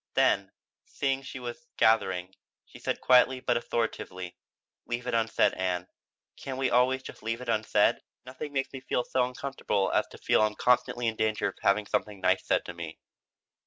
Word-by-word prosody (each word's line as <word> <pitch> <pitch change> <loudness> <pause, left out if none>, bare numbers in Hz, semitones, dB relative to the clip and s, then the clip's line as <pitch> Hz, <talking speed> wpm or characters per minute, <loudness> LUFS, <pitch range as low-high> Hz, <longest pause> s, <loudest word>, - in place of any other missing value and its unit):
Then, - - +3 0.4
seeing 135 -1 -1
what 130 -1 -8
was 125 +7 -7
gathering, 95 -5 +2 0.3
she - - -14
said - - -2
quietly 130 +1 +5
but 125 -1 0
authoritatively: 110 -6 -3 0.5
"Leave 120 +1 -3
it 125 - -2
unsaid, 115 0 +2
Ann. 90 -1 -2 0.5
Can't 130 -1 -6
we 130 -1 0
always 130 +2 +3
just - - -10
leave 115 +1 -2
it 125 - -8
unsaid? 110 0 +2 0.2
Nothing 130 +3 -7
makes 135 -1 -2
me 135 - -6
so 125 +1 +1
uncomfortable 125 -6 -1
as - - +2
to - - -13
feel - - +2
I'm 105 0 +2
constantly 120 0 +2
in 110 -1 -1
danger 110 -1 +1
of - - -13
having 105 +1 +3
something 105 0 -2
nice - - +2
said - - +1
to 85 - -6
me." 85 -2 -7
120 Hz, 175 wpm, -29 LUFS, 105-130 Hz, 0.5 s, quietly